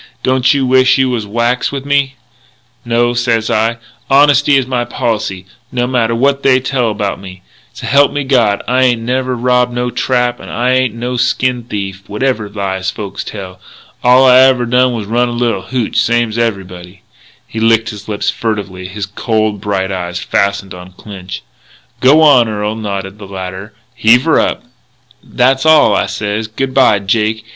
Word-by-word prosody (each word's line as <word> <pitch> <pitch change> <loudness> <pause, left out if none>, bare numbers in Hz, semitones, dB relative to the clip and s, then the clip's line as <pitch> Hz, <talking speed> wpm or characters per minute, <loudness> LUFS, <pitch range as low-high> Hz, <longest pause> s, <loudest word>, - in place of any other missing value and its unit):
Don't 130 0 +2
you 140 -2 +1
wish 130 0 +4
you 130 -1 +1
was 110 -4 -3
whacks 120 +4 -1
with 140 -1 -5
me?' 140 -1 0 0.7
"'No,' 120 0 +1
sez 120 -2 0
I, 115 +2 0 0.3
'honesty 145 0 +4
is 135 - 0
my 125 -2 -1
policy, 105 -6 -3 0.3
no 125 -2 -1
matter 120 -2 0
what 140 +3 +1
they 130 -2 +3
tell 130 -2 -1
about 105 -2 -3
me. 95 -1 -11 0.3
S'help 140 0 +2
me 145 - -2
God, 120 -7 +1
I 125 +1 +1
ain't 120 -3 +2
never 130 +1 -1
robbed 125 0 +1
no 125 0 -2
trap 125 -1 -1
and - - -11
I 125 +2 0
ain't 130 -3 +1
no 125 +2 -4
skin 125 0 0
thief, 100 -3 -6
whatever 110 -1 -2
lies 95 -2 -3
folks 100 -1 -6
tell. 95 -3 -8 0.4
All 125 +2 +5
I 130 0 +7
ever 130 -2 +4
done 125 +1 +2
was 110 -3 -4
run 120 +3 0
a - - -4
little 120 -5 -1
hootch, 125 -4 -2
same's 120 -2 +1
everybody.'" 95 -5 -4 0.4
He 110 - -7
licked 115 0 +2
his 105 -1 -11
lips 105 -2 -1
furtively, 100 -6 -4
his 100 +2 -5
cold, 110 0 -2
bright 100 -2 -2
eyes 90 -2 -4
fastened 100 +1 -1
on 90 0 -11
Clinch. 95 -2 -9 0.6
"G'wan, 140 -3 +5
Earl," 105 0 -3
nodded 100 -2 -5
the 100 - -10
latter, 95 +2 -7 0.2
"heave 120 +3 +4
her 160 - +3
up." - - -1 0.6
"That's 130 +1 +1
all. 155 -1 +5
I - - 0
sez, 105 +1 -3
'Good 130 +4 -4
bye, 130 -6 +4
Jake. 110 +2 -1
115 Hz, 170 wpm, -14 LUFS, 100-130 Hz, 0.7 s, I